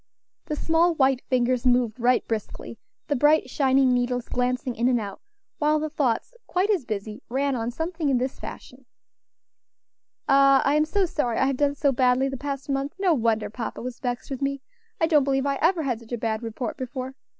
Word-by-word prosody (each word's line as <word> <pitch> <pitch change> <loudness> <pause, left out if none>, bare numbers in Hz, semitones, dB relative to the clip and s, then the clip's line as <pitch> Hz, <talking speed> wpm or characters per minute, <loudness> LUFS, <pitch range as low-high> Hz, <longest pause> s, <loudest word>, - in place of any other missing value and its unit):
The 300 - -3
small 330 +2 +2
white 265 -3 +2
fingers 250 -1 +1
moved 245 -2 +2
right 245 +1 +2
briskly, 220 -2 -5 0.3
the 290 - 0
bright 295 -1 +3
shining 265 -2 +3
needles 245 0 -1
glancing 250 0 -1
in 235 +2 +1
and 250 -2 +3
out, 200 -3 -7 0.4
while 305 0 +3
the 310 0 -3
thoughts, 280 - -1
quite 380 +4 +1
as 360 -11 0
busy, 210 -1 -5
ran 275 +2 0
on 230 -1 -2
something 320 +3 -2
in 265 - +3
this 255 +2 -3
fashion: 250 0 -10 1.4
"Ah! 275 0 +5
I 280 - +3
am 305 +1 +3
so 390 +4 +1
sorry 250 -9 -1
I - - +3
have 270 -1 0
done 285 0 +1
so 280 -1 +2
badly 255 +1 +2
the 270 - -4
past 275 +1 -5
month; 275 0 -2
no 380 -3 +3
wonder 220 -5 0
papa 230 0 -5
was 250 -1 -6
vexed 245 +1 -4
with 270 - -4
me. 275 -1 -2 0.4
I 325 - +4
don't 305 -3 +4
believe 270 0 0
I 275 -1 0
ever 335 0 +2
had 250 -5 -1
such 230 +1 -11
a - - 0
bad 220 -1 -2
report 230 +1 -5
before. 255 0 -5
265 Hz, 200 wpm, -25 LUFS, 245-290 Hz, 1.4 s, Ah